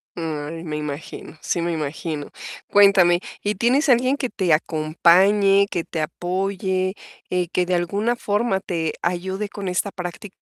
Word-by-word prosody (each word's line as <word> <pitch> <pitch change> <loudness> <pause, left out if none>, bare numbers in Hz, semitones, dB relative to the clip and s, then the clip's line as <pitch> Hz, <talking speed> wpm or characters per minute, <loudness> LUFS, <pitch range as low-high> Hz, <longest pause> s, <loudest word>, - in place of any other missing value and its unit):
Mm, 160 -1 -4
me 155 -3 -4
imagino, 150 +1 -7
sí 170 - -1
me 170 0 -1
imagino. 155 -1 -4 0.4
Cuéntame, 195 -4 +6 0.2
¿y 205 +1 0
tienes 260 +8 +2
alguien 255 +3 +4
que 255 -4 -3
te 180 -6 +1
acompañe, 185 +6 +4
que 170 - -1
te 160 -1 -4
apoye, 185 +3 -1 0.4
eh, 180 -1 0
que 180 - +1
de 180 - -1
alguna 200 +7 0
forma 205 -2 0
te 165 -4 -2
ayude 190 +4 -2
con 200 -1 -6
esta 185 +3 -1
práctica? 180 +2 -7
180 Hz, 150 wpm, -22 LUFS, 165-200 Hz, 0.4 s, Cuéntame